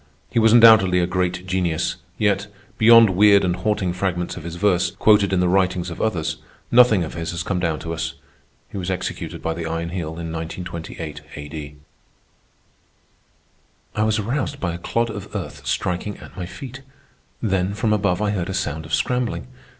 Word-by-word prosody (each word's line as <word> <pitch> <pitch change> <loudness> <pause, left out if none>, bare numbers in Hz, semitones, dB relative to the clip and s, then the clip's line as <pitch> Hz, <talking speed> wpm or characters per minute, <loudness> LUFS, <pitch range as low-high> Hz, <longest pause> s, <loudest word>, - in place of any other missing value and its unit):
He 120 - +2
was 110 0 +5
undoubtedly 110 -6 +7
a 90 - +2
great 90 0 -1
genius; 90 -4 -1 0.2
yet, 100 -1 +1 0.3
beyond 115 -1 +8
weird 100 +1 +5
and 90 -1 +1
haunting 105 -4 -1
fragments 90 -2 -2
of - - -7
his 85 0 -6
verse, 90 -1 +2
quoted 105 -2 +3
in 95 -1 +2
the 90 - +2
writings 90 -1 +1
of 85 - -6
others, 90 -8 -1 0.3
nothing 120 -6 +6
of 80 - -6
his 80 -1 -4
has 85 -1 -3
come 90 +2 -1
down 85 -3 0
to 85 - -4
us. 80 - -3 0.6
He 100 - -5
was 90 0 -4
executed 95 -2 -4
by 80 - -1
the 85 0 -5
Iron 80 +1 -3
Heel 80 -3 -4
in 85 -1 -5
1928 80 -2 -6
A.D. 75 0 -7 2.2
I 105 - +1
was 110 0 +2
aroused 130 +6 -2
by 90 -2 -2
a 85 - -6
clod 115 +5 -1
of 100 -2 -8
earth - - -6
striking 95 +3 -2
at - - -13
my 90 -2 -5
feet. 135 +5 -9 0.6
Then 95 -2 0
from 105 +1 +1
above, 100 -2 +1
I 105 - +1
heard 95 -3 -2
a 95 - -3
sound 80 -2 -3
of 80 - +1
scrambling. 125 -1 -1
90 Hz, 180 wpm, -22 LUFS, 85-105 Hz, 2.2 s, beyond